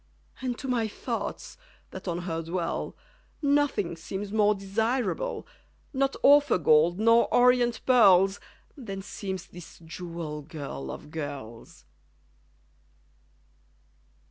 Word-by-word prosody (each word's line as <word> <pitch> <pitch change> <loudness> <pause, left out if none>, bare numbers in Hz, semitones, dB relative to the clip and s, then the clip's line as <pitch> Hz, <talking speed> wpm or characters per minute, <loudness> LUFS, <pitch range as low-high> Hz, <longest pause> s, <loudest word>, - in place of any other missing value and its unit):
And 250 -2 -2
to 270 - -6
my 240 -3 +1
thoughts, 210 - -5 0.3
that - - -9
on 175 0 -2
her 165 -2 -3
dwell, 170 +1 -3 0.4
Nothing 285 - +1
seems 190 +5 -6
more 210 -1 +3
desirable 225 - -1 0.5
Not 275 0 +1
OPHIR 285 -3 +6
gold 165 +2 +4
nor 230 +1 +4
ORIENT 245 -1 +4
pearls 195 -6 +5 0.4
Than 195 -9 -7
seems 190 -2 -5
this 175 -1 -13
jewel 165 -2 -6
girl 140 - -7
of 150 - -8
girls. 140 -7 -7
195 Hz, 105 wpm, -27 LUFS, 165-240 Hz, 0.5 s, OPHIR